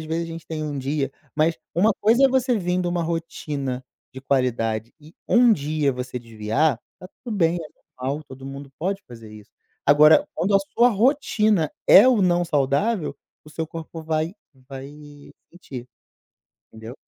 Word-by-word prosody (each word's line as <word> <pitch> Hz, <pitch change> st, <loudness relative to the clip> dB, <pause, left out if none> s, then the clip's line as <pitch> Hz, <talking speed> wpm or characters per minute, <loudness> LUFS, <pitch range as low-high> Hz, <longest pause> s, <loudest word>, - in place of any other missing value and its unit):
às 155 Hz, -, -8 dB
vezes 165 Hz, +2 st, -2 dB
a -, -, -7 dB
gente 165 Hz, 0 st, -9 dB
tem 155 Hz, -1 st, -4 dB
um 145 Hz, -2 st, -4 dB
dia 135 Hz, 0 st, -2 dB, 0.2 s
mas 160 Hz, +2 st, +1 dB, 0.2 s
uma 210 Hz, +6 st, +4 dB
coisa 235 Hz, +6 st, +4 dB
é -, -, +7 dB
você 255 Hz, -1 st, +1 dB
vindo 180 Hz, -1 st, -1 dB
uma 175 Hz, 0 st, -1 dB
rotina 150 Hz, -6 st, -4 dB, 0.3 s
de 130 Hz, -, -9 dB
qualidade 120 Hz, -4 st, -1 dB
e 155 Hz, +2 st, -17 dB
1 240 Hz, -1 st, +6 dB
dia 150 Hz, -4 st, 0 dB
você 125 Hz, 0 st, -5 dB
desviar, 115 Hz, +4 st, -1 dB, 0.2 s
tá 180 Hz, -, -10 dB, 0.2 s
tudo 225 Hz, -4 st, -4 dB
bem, 170 Hz, -2 st, +2 dB
é 165 Hz, -2 st, -6 dB, 0.3 s
normal, 140 Hz, +4 st, -3 dB
todo 135 Hz, -1 st, -11 dB
mundo 140 Hz, 0 st, -8 dB
pode 195 Hz, +4 st, -2 dB
fazer 115 Hz, -3 st, -12 dB
isso. 105 Hz, -1 st, -14 dB, 0.4 s
Agora, 150 Hz, +2 st, +6 dB
quando 200 Hz, +3 st, 0 dB
a -, -, +7 dB, 0.2 s
sua 240 Hz, +1 st, +5 dB
rotina 215 Hz, -, +2 dB, 0.2 s
é 200 Hz, -, +9 dB
o 235 Hz, -6 st, +3 dB
não 175 Hz, -1 st, +2 dB
saudável, 160 Hz, -, 0 dB, 0.3 s
o 155 Hz, -, -14 dB
seu 160 Hz, +1 st, -4 dB
corpo 165 Hz, 0 st, -8 dB
vai 160 Hz, +1 st, -1 dB, 0.4 s
vai 135 Hz, -1 st, -8 dB, 0.7 s
sentir, 130 Hz, -8 st, -10 dB, 0.8 s
entendeu? 110 Hz, +2 st, -10 dB
155 Hz, 170 wpm, -23 LUFS, 135-180 Hz, 0.8 s, é